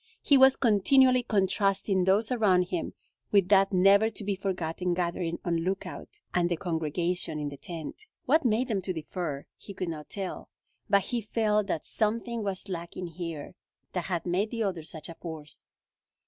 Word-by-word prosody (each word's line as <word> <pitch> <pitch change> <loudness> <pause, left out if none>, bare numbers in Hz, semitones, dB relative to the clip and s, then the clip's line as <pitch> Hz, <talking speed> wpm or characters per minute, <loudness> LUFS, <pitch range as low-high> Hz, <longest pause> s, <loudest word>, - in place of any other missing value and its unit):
He 285 - +5
was 265 0 +7
continually 255 +4 +4
contrasting 195 -3 +1
those 205 +5 +2
around 190 -7 +3
him 175 - -3 0.4
with 195 -3 +4
that 195 0 +5
never 200 +3 +5
to 220 - -6
be 200 0 -1
forgotten 180 -2 -2
gathering 170 -1 -1
on 170 -2 +1
Lookout, 190 - -4
and 175 -1 +2
the 175 - +1
congregation 165 0 -1
in 150 -1 -3
the 140 - -9
tent. 165 - -7 0.2
What 310 +5 +4
made 240 +1 +2
them 210 -6 -1
to 185 0 -3
differ? 160 -3 -4
He 200 - -11
could 185 -2 -3
not 155 -2 -7
tell, 195 -2 -5 0.4
but 200 -1 +4
he 240 -1 -2
felt 210 -1 +1
that 160 - -2
something 230 +2 -1
was 195 -1 -3
lacking 175 -1 -5
here 165 -3 -6 0.4
that 180 -2 -2
had 175 -3 -2
made 185 +5 0
the 230 -1 -2
other 185 -5 -2
such 155 0 -8
a 170 - -7
force. 160 -3 -9
190 Hz, 175 wpm, -28 LUFS, 170-210 Hz, 0.4 s, was